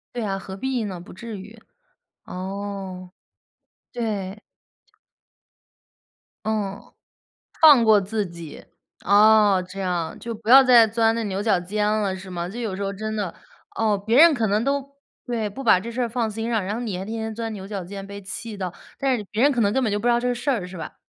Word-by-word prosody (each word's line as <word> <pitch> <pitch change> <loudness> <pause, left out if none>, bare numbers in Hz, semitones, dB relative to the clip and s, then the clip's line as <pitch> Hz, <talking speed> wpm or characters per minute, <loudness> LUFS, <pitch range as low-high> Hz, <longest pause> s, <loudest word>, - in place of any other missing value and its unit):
对 235 - -2
啊， 195 -2 -2
何 190 0 -8
必 260 0 -2
呢？ 185 -3 -5
不 175 - -12
至 220 +2 -8
于， 210 +4 -12 0.7
哦， 190 -1 -6 0.8
对。 210 -4 -4 2.0
嗯， 205 -3 -2 0.8
放 290 -7 +8
过 215 -2 +6
自 205 +1 -2
己。 170 -3 -10 0.4
哦， 205 -1 +5
这 190 +2 -8
样， 175 -4 -2
就 230 -1 -6
不 220 +1 -10
要 270 +2 +10
再 245 -3 +7
钻 225 +1 +2
这 230 - -2
牛 195 -1 -2
角 215 -4 +2
尖 210 +4 -1
了 210 -3 0
是 190 0 -9
吗？ 175 -1 -4
就 230 +6 -7
有 210 -5 -3
时 200 - -4
候 195 0 -2
真 215 +2 -4
的， 200 -5 -3 0.4
哦， 215 -2 +1
别 220 +4 0
人 330 -1 +8
可 230 -3 0
能 210 +2 +1
都 280 +1 -2 0.3
对， 225 -3 -2
不 270 +7 -8
把 210 -5 +5
这 230 +4 -6
事 250 +2 -2
儿 240 - 0
放 230 -1 -1
心 225 +2 -4
上。 225 -4 +1
然 200 +3 -3
后 230 - -4
你 205 -6 -3
还 190 - -5
天 225 +1 -4
天 220 0 -4
钻 225 0 -4
牛 190 -1 -8
角 195 -2 -5
尖 195 +1 -8
被 200 0 -8
气 210 +3 -6
到， 185 -3 -3 0.3
但 270 -2 +1
是 210 - -6
别 215 +3 0
人 285 - +6
可 245 -4 0
能 200 - +2
根 265 +3 +1
本 220 - +1
就 205 - 0
不 235 - -4
知 - - +5
道 235 - +2
这 245 0 0
事 245 +4 -2
儿 220 -9 -1
是 180 0 -10
吧？ 165 - -8
210 Hz, 230 characters per minute, -23 LUFS, 195-230 Hz, 2.0 s, 要